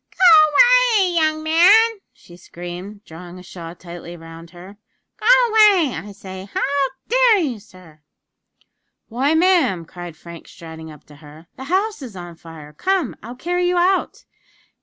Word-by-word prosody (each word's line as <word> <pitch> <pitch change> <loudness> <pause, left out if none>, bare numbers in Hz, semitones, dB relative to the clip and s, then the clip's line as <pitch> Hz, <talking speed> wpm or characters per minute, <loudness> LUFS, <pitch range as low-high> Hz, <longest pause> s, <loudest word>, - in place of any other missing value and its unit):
"Go 320 -4 +5 0.5
away, 375 -3 +1
young 310 -2 0
man!" 375 +9 +4 0.2
she 175 - -18
screamed, 180 +4 -10
drawing 175 +2 -12
a 180 - -13
shawl 170 -2 -10
tightly 175 0 -11
round 165 0 -13
her. 180 +4 -14 0.4
"Go 430 - -6 0.2
away, 415 - +3
I 200 +6 -8
say! 190 -1 -11
how 280 -1 -1 0.2
dare - - +3
you, 275 - -3
sir?" 180 -6 -19 1.1
"Why, 265 +7 0
ma'am," 320 - +1
cried 175 -1 -11
Frank, 170 +1 -13
striding 160 -2 -12
up 150 -2 -15
to 150 - -18
her; 150 +2 -16
"the 265 - -10
house 390 +4 -2
is 240 -7 -10
on 175 -1 -9
fire! 160 -2 -14
Come, 370 - -2
I'll 240 +3 -10
carry 355 +6 -2
you 355 0 0
out." 370 +2 -1
205 Hz, 155 wpm, -19 LUFS, -, 1.1 s, Go